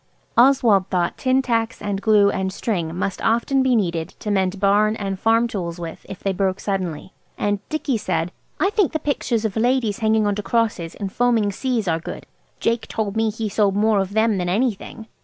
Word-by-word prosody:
Oswald 235 -7 +4
thought 175 -2 0
tin 260 +1 +1
tacks, 230 -1 -1
and 200 -1 -3
glue, 205 -2 +4
and 190 0 -2
string 175 -6 -2
must 190 +1 -3
often 235 +4 +2
be 260 -1 +3
needed 170 -6 0
to 210 - -4
mend 190 -1 0
barns 210 +2 +3
and 195 -2 -3
farm 230 +2 +3
tools 175 -6 -4
with 165 -1 -8
if 195 - -8
they 195 - 0
broke 190 0 0
suddenly. 185 -3 -3 0.2
And 205 -1 0
Dicky 300 -5 -1
said– 165 -4 -2 0.3
"I 385 - +2
think 415 -6 +1
the - - +2
pictures 245 -6 -1
of 210 - -2
ladies 235 -2 +1
hanging 220 -1 +2
on 205 - +1
to 210 - -3
crosses 220 -7 -1
in 200 - -4
foaming 230 -2 +1
seas 235 -1 -2
are 165 -1 +1
good. - - -8 0.3
Jake 230 0 0
told 210 -2 -3
me 225 0 +2
he 220 +1 -3
sold 205 -1 +1
more 210 0 +3
of 195 0 -2
them 220 -2 +2
than 175 -1 -1
anything. 220 +2 -2
210 Hz, 200 wpm, -22 LUFS, 190-230 Hz, 0.3 s, Oswald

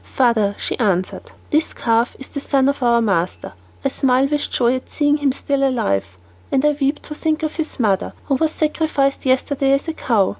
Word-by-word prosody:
"Father," 220 -6 +2
she - - -3
answered, 185 -5 -1 0.2
"this 310 +2 +1
calf 230 +1 +1
is 270 - -10
the 280 - -5
son 275 -1 +1
of 280 0 0
our 235 -1 +3
master. 185 -4 -1 0.3
I - - +3
smile 265 -1 +2
with 295 0 -1
joy 240 0 +2
at 255 - -11
seeing 295 -1 +2
him 285 -2 +1
still 275 +1 -1
alive, 100 - 0 0.3
and 270 +2 +2
I 300 - +5
weep 280 +2 0
to 300 - -7
think 310 +1 -1
of 310 0 -3
his 320 -4 -4
mother, 200 -5 +1
who 280 - 0
was 310 +4 +1
sacrificed 305 -4 0
yesterday 270 +1 +2
as 275 +4 0
a 325 - -2
cow. 220 -10 +1
270 Hz, 200 wpm, -20 LUFS, 235-290 Hz, 0.3 s, I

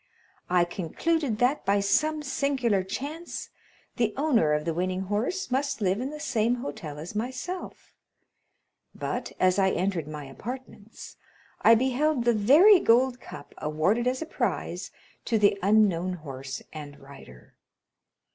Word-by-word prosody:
I 175 -1 +4
concluded 225 - -1
that, 250 +6 +1
by 200 +1 +2
some 305 +10 +1
singular 265 -7 0
chance, 285 - -6 0.5
the 225 -3 0
owner 260 - +2
of 150 0 -1
the 165 - -1
winning 185 +2 -1
horse 215 - -2
must 275 +1 0
live 195 +1 0
in 260 - -3
the 300 +1 -8
same 240 -5 +1
hotel 220 - -6
as 160 +6 -7
myself; 255 - -5 1.0
but, - - -4
as 185 +1 +3
I 190 -1 +4
entered 180 -4 -1
my 150 -1 -7
apartments, 225 - -9 0.4
I 230 - +7
beheld 260 +2 +1
the 240 - +4
very 300 - +7
gold 250 0 +3
cup - - -11
awarded 170 +11 0
as 255 +4 0
a - - -8
prize - - -3 0.4
to 230 - +1
the 205 -1 +4
unknown 190 -3 +3
horse 135 -5 -7
and 145 -2 -9
rider. 135 - -15
215 Hz, 140 wpm, -27 LUFS, 180-260 Hz, 1.0 s, I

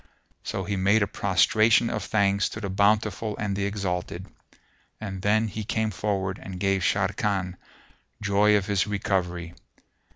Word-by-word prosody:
So 95 - -3
he 100 +1 -2
made 100 +3 +3
a - - -1
prostration 110 +5 +3
of 110 -3 -3
thanks 100 -2 +1
to - - -7
the 100 -3 -4
Bountiful 105 +1 +1
and 100 -1 -2
the 100 0 -1
Exalted; 95 -3 -3 0.7
and 95 -3 -6
then 110 +3 +2
he 110 +1 -5
came 110 +1 -1
forward 95 -1 -2
and 95 -1 -7
gave 95 0 +1
Sharrkan 95 -1 0 0.6
joy 105 +1 +3
of 100 - -2
his 100 0 0
recovery. 90 -4 -2
100 Hz, 150 wpm, -26 LUFS, 95-105 Hz, 0.7 s, made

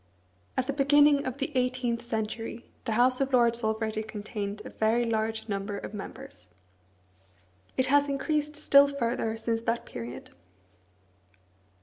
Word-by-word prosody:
At 260 - +1
the 280 - -2
beginning 290 0 +4
of 255 +1 -4
the 280 +1 -4
eighteenth 250 -2 0
century 225 0 -4 0.2
the 225 - -1
House 255 +3 +3
of 270 0 0
Lords 235 -1 +3
already 220 0 -1
contained 210 -1 -5
a - - -8
very 225 +2 +1
large 220 0 -1
number 200 0 -3
of 200 - -7
members. 265 +7 -9 1.3
It 260 - +4
has 285 +2 +3
increased 295 +2 -1
still 285 -1 +6
further 235 -5 -1
since 225 0 -1
that 230 0 -1
period. 120 +1 -8
235 Hz, 135 wpm, -28 LUFS, 220-275 Hz, 1.3 s, still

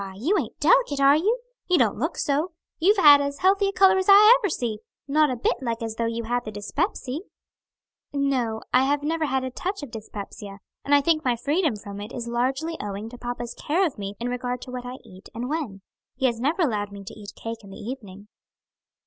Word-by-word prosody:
"Why, 190 -1 -8
you 310 - +1
aint - - -6
delicate, - - +3
are 275 +1 +6
you? 430 +10 +1 0.3
You 360 - +5
don't - - +2
look - - -2
so; 300 +5 0 0.3
you've 400 +6 +4
as 285 -3 +6
healthy 390 +3 +3
a - - 0
color 385 -2 +5
as 375 - -1
ever 395 - +10 0.3
I - - -4
see; 235 -8 -2 0.3
not 300 +1 +3
a 255 - -1
bit 240 - 0
like 230 -2 -3
as 225 -1 -3
though 230 0 -1
you 230 0 -3
had 245 +2 -1
the 215 - -6
dyspepsy." 255 - -3 0.9
"No, 260 -6 -1
I 255 +1 +5
have 285 +1 0
never 320 +1 0
had 265 -2 0
a 260 - -4
touch 375 +6 -4
of 275 - -8
dyspepsia, 205 -2 -8 0.3
and 285 - +4
I 285 - +5
think 310 +1 +2
my 250 -2 +2
freedom 290 - 0
from 200 0 -8
it 210 +3 -7
is 235 -1 -5
largely 265 +7 -1
owing 205 +2 -5
to 245 - -11
papa's 240 -1 -5
care 350 +6 0
of 290 - -4
me 200 0 -5
in 240 - -3
regard 250 0 -3
to 255 - -9
what 250 -1 -6
I 250 - -6
eat 185 +1 -14
and 240 +2 -3
when. 270 -10 -4 0.3
He 265 +1 -1
has 235 -3 +1
never 310 +8 +1
allowed 210 -7 -1
me 200 0 -9
to 195 - -9
eat 210 -1 -10
cake 225 -1 -7
in 200 - -13
the 195 - -10
evening." 205 -4 -8
255 Hz, 225 wpm, -25 LUFS, 225-310 Hz, 0.9 s, ever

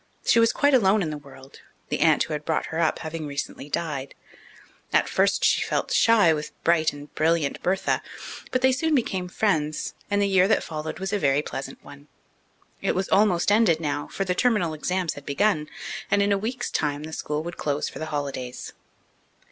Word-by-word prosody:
She 235 - +5
was 230 0 +5
quite 285 0 +2
alone 210 -4 +4
in 155 - -3
the 150 - -4
world, 135 -1 -15 0.3
the - - -1
aunt - - +4
who 155 - -5
had 150 0 -3
brought 160 0 -1
her 160 - -1
up 165 -2 +2
having 160 -1 -5
recently 140 0 -5
died. 145 -4 -3 0.8
At - - +3
first - - +2
she - - +3
had - - -3
felt - - -1
shy 210 -8 +5
with 150 -1 -6
bright 160 -2 +3
and 145 0 -12
brilliant 160 -2 +1
Bertha; 190 +1 0 0.5
but 255 0 -1
they 260 - +6
soon 310 +4 +1
became 190 -8 -1
friends, 155 -6 -1 0.2
and 205 0 +1
the 200 - +2
year 190 -1 +4
that 220 - +2
followed 155 -1 -5
was 190 +2 -4
a 205 - +1
very 145 -2 +2
pleasant 135 -2 -7
one. 145 +1 -13 0.7
It - - 0
was 190 +1 -1
almost 195 -2 +3
ended 205 -7 +4
now, 145 -2 -2
for 195 - -3
the 180 - 0
terminal 185 -6 +1
exams 180 +2 -1
had 145 - -10
begun, 150 +2 0 0.4
and 200 0 +3
in 200 - +1
a - - +4
week's 240 +4 -3
time 145 -1 -1
the 160 +1 -8
school 150 0 -3
would 170 +1 -7
close 145 -1 -1
for - - -8
the 160 - -4
holidays. 140 -4 -5
165 Hz, 205 wpm, -25 LUFS, 150-200 Hz, 0.8 s, they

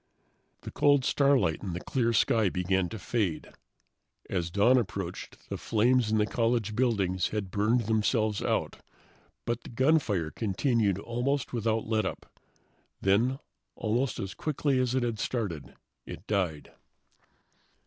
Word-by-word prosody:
The - - -8
cold 145 -3 +3
starlight 135 - +2
of 95 -4 -4
the - - -3
clear 115 +3 0
sky 110 -2 +3
began 90 0 0
to 110 - -6
fade. 100 -6 -2 0.8
As 85 -3 -1
dawn 110 +8 +4
approached, 95 -5 -6
the - - -4
flames 115 +1 +2
in 110 - +3
the 105 - +3
college 115 -2 0
buildings 100 -7 +1
had 105 -3 -4
burned 110 +5 +2
themselves 110 -1 +1
out. - - -1 0.7
But 120 0 -2
the - - -11
gunfire 115 - +1
continued 110 -1 0
almost 125 +6 -2
without 115 -1 0
letup. 110 -1 -1 0.8
Then, 115 +7 +2 0.4
almost 120 +4 -1
as 95 -2 -4
quickly 145 - 0
as 125 0 0
it 130 - +1
had 115 -3 -2
started, 85 - -3 0.3
it - - -9
died. 90 -8 -2
110 Hz, 135 wpm, -29 LUFS, 95-125 Hz, 0.8 s, dawn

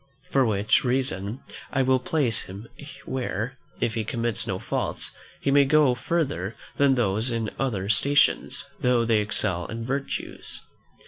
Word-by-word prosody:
For 135 - +4
which 105 -1 +2
reason 125 -4 -1 0.3
I 135 - +2
will 130 0 +3
place 130 -6 +2
him 100 +5 -9 0.4
where, 125 -1 -3 0.2
if 115 - 0
he 110 -1 -1
commits 115 -1 -1
no - - -1
faults, - - -2 0.3
he 140 - +1
may 140 0 +6
go 145 -2 +4
further 120 - -2 0.2
than 140 -1 +4
those 110 0 +2
in 115 -3 -1
other 105 -8 -1
stations, 140 +8 +3
though 125 -2 +2
they 115 -2 +3
excel 95 -4 0
in 115 0 -5
virtues. 135 +3 -4
120 Hz, 145 wpm, -25 LUFS, 105-135 Hz, 0.4 s, may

